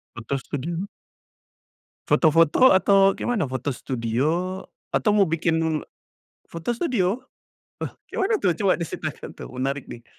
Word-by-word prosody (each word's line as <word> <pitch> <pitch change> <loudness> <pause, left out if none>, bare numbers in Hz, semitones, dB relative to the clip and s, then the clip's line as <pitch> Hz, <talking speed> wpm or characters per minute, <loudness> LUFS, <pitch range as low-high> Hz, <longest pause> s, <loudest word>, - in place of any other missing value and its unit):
Foto 120 +4 -3
studio? 165 +8 -4 1.2
Foto-foto 165 - +5
atau 195 0 +4
gimana? 215 - -1
Foto 130 +2 -2
studio 145 +11 -1 0.3
atau 210 - +2
mau 200 - +6
bikin 160 -2 0 0.7
foto 165 +7 -5
studio? 235 - 0 0.7
Wah, - - -24
kek - - -8
mana 410 +4 +2
tuh 185 - +2
coba 195 +1 +2
diceritakan 170 -2 -5
tuh - - -9
menarik 135 +1 -2
nih. 120 0 -9
165 Hz, 125 wpm, -24 LUFS, 140-195 Hz, 1.2 s, mau